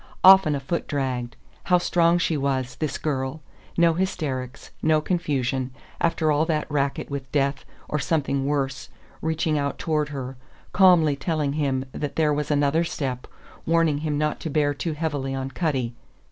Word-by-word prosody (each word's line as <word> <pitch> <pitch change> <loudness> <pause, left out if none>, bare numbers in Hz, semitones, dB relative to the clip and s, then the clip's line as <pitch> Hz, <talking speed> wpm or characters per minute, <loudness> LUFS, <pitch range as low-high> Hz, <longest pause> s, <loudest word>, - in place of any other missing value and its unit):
Often 190 -5 +8
a - - -2
foot 150 +5 -3
dragged. 130 -5 -2 0.3
How 180 - +5
strong 175 -1 +3
she 165 -2 0
was, 135 -3 -1
this 155 -2 -2
girl! 135 0 -3 0.3
No 170 -1 +5
hysterics, 145 -8 -3
no 155 0 +3
confusion, 140 -6 -1 0.3
after 160 -2 +1
all 150 +1 +3
that 155 -2 0
racket, 140 -1 -1
with 135 -2 -5
death 140 -1 0 0.2
or 150 - -1
something 140 -2 0
worse 140 -2 -2 0.3
reaching 160 -1 0
out 140 0 -2
toward 150 -3 0
her; 135 -2 -6 0.4
calmly 175 -6 +5
telling 150 -1 -1
him 135 -3 0
that 145 +1 -4
there 155 -2 +2
was 150 0 -2
another 145 +2 +2
step, 130 -6 -4 0.4
warning 165 -3 +3
him 150 -1 -1
not 150 0 0
to 160 - -4
bear 145 -1 +2
too 160 +3 -3
heavily 145 -4 -2
on 135 0 -4
Cutty! 130 -6 -1
145 Hz, 160 wpm, -24 LUFS, 135-160 Hz, 0.4 s, Often